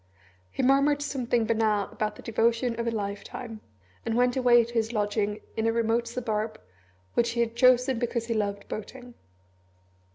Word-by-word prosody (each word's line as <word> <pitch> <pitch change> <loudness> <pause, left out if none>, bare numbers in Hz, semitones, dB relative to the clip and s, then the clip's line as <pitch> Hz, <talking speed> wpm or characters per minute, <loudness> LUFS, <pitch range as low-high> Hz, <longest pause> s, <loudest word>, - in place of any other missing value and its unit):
He - - -3
murmured 280 +2 +3
something 245 -5 0
banal 220 -2 +2
about 215 -1 -2
the - - -13
devotion 230 +1 +1
of 235 - -1
a - - +1
lifetime, 215 +2 -5 0.4
and 225 - -1
went 245 0 +3
away 245 -2 +5
to 235 - -11
his 225 -1 0
lodging 210 -1 -1
in 225 0 0
a - - +3
remote 230 +1 +1
suburb, 225 -3 -3 0.5
which 235 0 +2
he 235 - -3
had 230 -1 0
chosen 255 0 +4
because 235 -1 -2
he 230 - -1
loved 200 -2 -2
boating. 245 +3 -8
230 Hz, 165 wpm, -27 LUFS, 220-245 Hz, 0.5 s, away